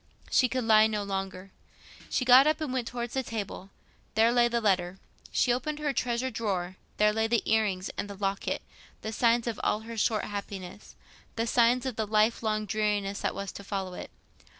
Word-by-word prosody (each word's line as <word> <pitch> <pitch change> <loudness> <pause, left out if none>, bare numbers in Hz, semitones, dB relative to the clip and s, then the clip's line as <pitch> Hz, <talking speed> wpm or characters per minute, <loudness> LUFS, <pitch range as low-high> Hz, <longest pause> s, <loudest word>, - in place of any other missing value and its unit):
She 255 - +4
could 255 0 -1
lie 220 -1 +6
no 210 -2 -2
longer. 195 -1 -5 0.6
She 255 - 0
got 255 +3 +8
up 310 - +2
and 300 -5 -3
went 250 -3 -1
towards 240 -1 -4
the 265 - 0
table: 210 -5 -6 0.5
there 225 +2 +5
lay 240 0 +4
the 235 0 0
letter. 185 -4 +1 0.3
She 245 - +2
opened 295 +5 -2
her 295 -2 -1
treasure 250 0 -1
drawer: 185 -5 -2 0.2
there 210 0 +4
lay 220 +1 +1
the 235 -1 +1
ear 220 0 +3
rings 185 -2 -3
and 205 - -3
the 200 - -7
locket—the 200 +2 -4
signs 235 +1 +3
of 235 -3 -3
all 210 - +1
her 230 +1 -8
short 215 -1 +1
happiness—the 200 +2 -7
signs 240 +2 +3
of 255 -4 -3
the 220 -1 -1
lifelong 215 0 +1
dreariness 210 -1 -1
that - - -1
was 200 0 -4
to 200 - -10
follow 195 -2 -4
it. - - -7
220 Hz, 190 wpm, -28 LUFS, 200-240 Hz, 0.6 s, got